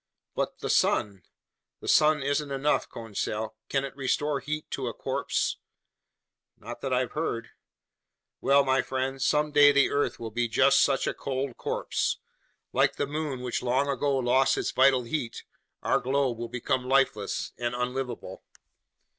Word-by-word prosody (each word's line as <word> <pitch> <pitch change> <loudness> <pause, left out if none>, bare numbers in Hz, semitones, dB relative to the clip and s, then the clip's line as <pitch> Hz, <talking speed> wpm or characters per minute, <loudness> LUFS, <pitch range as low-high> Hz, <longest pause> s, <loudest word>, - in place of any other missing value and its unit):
"But - - -3
the - - -3
sun—" 100 -3 +2 0.6
"The - - -10
sun 155 -2 +4
isn't 145 +1 0
enough, 140 +2 0
Conseil. 110 -1 -4
Can 135 0 0
it 135 - -8
restore 140 +1 0
heat 150 +3 -4
to 130 -2 -3
a 115 - -4
corpse?" - - -1 1.0
"Not 120 +3 -9
that 135 - -3
I've 125 0 +1
heard." 120 -7 -3 0.9
"Well, 140 +1 +4
my 130 0 +3
friend, 130 +1 -3
someday 150 +1 +5
the 140 -1 +3
earth 145 0 0
will 115 -1 -6
be 120 +2 0
just 130 +4 +4
such 135 -1 +2
a - - -1
cold 135 -2 -3
corpse. - - -1 0.6
Like - - +3
the 145 - -1
moon, 145 -3 -3
which 125 -1 -2
long 130 +3 +1
ago 140 0 +1
lost 130 +1 +3
its - - -1
vital 130 -1 +4
heat, 120 -1 -4 0.4
our 135 - +2
globe 130 -2 0
will 120 0 -4
become 125 +1 -2
lifeless 135 0 +1
and 120 0 -2
unlivable." 125 0 -4
135 Hz, 155 wpm, -27 LUFS, 125-140 Hz, 1.0 s, someday